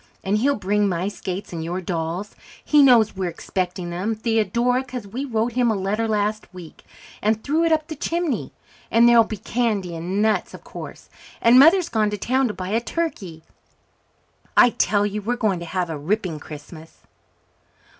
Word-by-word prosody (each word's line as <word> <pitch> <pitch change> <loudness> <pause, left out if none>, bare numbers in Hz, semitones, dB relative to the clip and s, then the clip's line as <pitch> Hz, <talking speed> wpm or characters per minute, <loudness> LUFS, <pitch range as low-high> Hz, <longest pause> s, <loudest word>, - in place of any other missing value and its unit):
And 200 +2 +1
he'll 280 +4 +2
bring 205 +1 +1
my 180 +2 -1
skates 190 -2 -6
and 165 -1 -4
your 175 +3 -3
dolls. 175 +2 -4 0.3
He 300 -1 +5
knows 240 -7 +5
we're 190 -2 -2
expecting 180 +1 -4
them, 195 +6 -2
Theodora, 235 +3 +1
'cause 250 -4 -7
we 240 +8 -5
wrote 230 -2 -1
him 245 -1 +2
a 220 - +1
letter 205 +4 -1
last 215 0 -1
week, 180 -4 -12 0.4
and 220 +1 0
threw 310 +4 +1
it 330 - +1
up 315 -1 +2
the 315 0 -7
chimney. 330 -2 -2 0.4
And 235 +1 +5
there'll 235 -1 +7
be 220 -1 -6
candy 205 -6 -2
and 175 +4 -3
nuts, 215 0 0
of - - -14
course, - - -10 0.3
and 235 +2 +6
Mother's 330 +5 +6
gone 215 -2 +1
to 210 - -3
town 260 +5 +1
to 215 - -4
buy 185 0 -5
a 225 +3 +1
turkey. 205 - -4 1.1
I 245 - +7
tell 205 -3 +1
you 210 +1 -3
we're 235 +4 -1
going 210 -7 0
to 170 - -7
have 175 0 -2
a 155 - -4
ripping 180 0 -2
Christmas." 155 +2 -11
210 Hz, 185 wpm, -22 LUFS, 185-240 Hz, 1.1 s, there'll